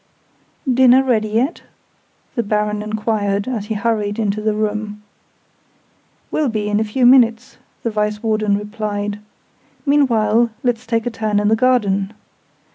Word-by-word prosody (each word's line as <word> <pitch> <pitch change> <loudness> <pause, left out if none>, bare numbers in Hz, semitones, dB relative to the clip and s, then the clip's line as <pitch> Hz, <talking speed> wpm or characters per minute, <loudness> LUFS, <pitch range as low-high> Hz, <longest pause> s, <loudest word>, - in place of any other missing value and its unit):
"Dinner 260 +1 +5
ready 225 -5 +1
yet?" 240 +10 -1 0.7
the 235 - 0
Baron 210 -1 -1
enquired, 210 -1 -1
as 230 -5 -3
he 220 - -2
hurried 210 -1 -1
into 215 -1 -1
the 215 0 0
room. 210 0 -3 1.3
"Will 300 -4 0
be 215 -2 -2
in 210 0 +1
a - - +1
few 230 +4 0
minutes," 245 0 +4 0.2
the 230 - -1
Vice 210 0 -2
Warden 215 -2 +1
replied. 210 0 -4 0.7
"Meanwhile, 235 -5 +3
let's 245 -1 -1
take 230 -1 0
a 245 - -1
turn 215 -2 -1
in 210 0 +1
the 220 - +4
garden. 215 -5 +1
215 Hz, 140 wpm, -19 LUFS, 210-235 Hz, 1.3 s, Dinner